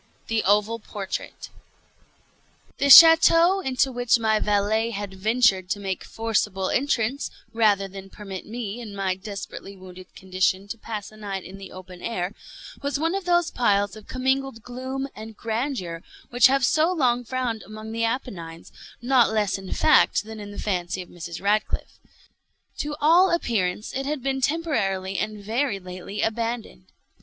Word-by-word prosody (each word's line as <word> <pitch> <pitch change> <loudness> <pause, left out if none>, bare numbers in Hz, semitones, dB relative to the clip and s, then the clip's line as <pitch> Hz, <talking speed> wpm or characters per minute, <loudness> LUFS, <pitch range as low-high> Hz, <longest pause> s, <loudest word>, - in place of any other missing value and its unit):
THE 225 -1 +1
OVAL 210 +3 +2
PORTRAIT 205 -2 -6 1.3
The 280 - +2
château 330 +5 +8
into 265 0 +1
which 245 -1 +2
my 220 -2 +2
valet 210 +2 +1
had 205 -3 -5
ventured 195 -2 +2
to 205 - -1
make 190 -2 -4
forcible 210 -4 -1
entrance, 265 -1 0 0.2
rather 210 -3 +3
than 195 0 -10
permit 195 -2 -8
me, 225 -1 -5
in 210 -4 -8
my 195 -2 0
desperately 200 0 -8
wounded 185 0 -12
condition, 190 +1 -1
to 230 - -5
pass 215 -2 -6
a 215 - -16
night 200 -3 -5
in 195 +2 -10
the 195 - -10
open 185 -1 -11
air, 190 -4 -3 0.5
was 280 0 -2
one 325 +3 0
of 390 -1 -3
those 350 -1 +2
piles 205 -4 +1
of 215 -1 -13
commingled 265 -2 -1
gloom 260 +2 -5
and 220 0 -10
grandeur 225 - -3 0.3
which 245 -1 +6
have 270 -1 +2
so 315 +7 +3
long 250 -8 +1
frowned 245 -2 -3
among 215 +1 -9
the 230 0 -2
Appennines, 190 -9 -4 0.3
not 250 -2 +4
less 210 -3 0
in 190 -1 -9
fact 310 - +4
than 220 0 -9
in 205 -1 -8
the 205 - -10
fancy 180 -2 -2
of - - -19
Mrs. 170 -1 -8
Radcliffe. 210 +2 -1 0.8
To 295 0 -3
all 340 +5 +5
appearance 215 - -1
it 270 +1 -3
had 290 -3 -3
been 270 0 -1
temporarily 195 - -1
and 215 -1 -4
very 230 +2 -1
lately 185 +2 -6
abandoned. 225 - -3
220 Hz, 160 wpm, -24 LUFS, 195-255 Hz, 1.3 s, château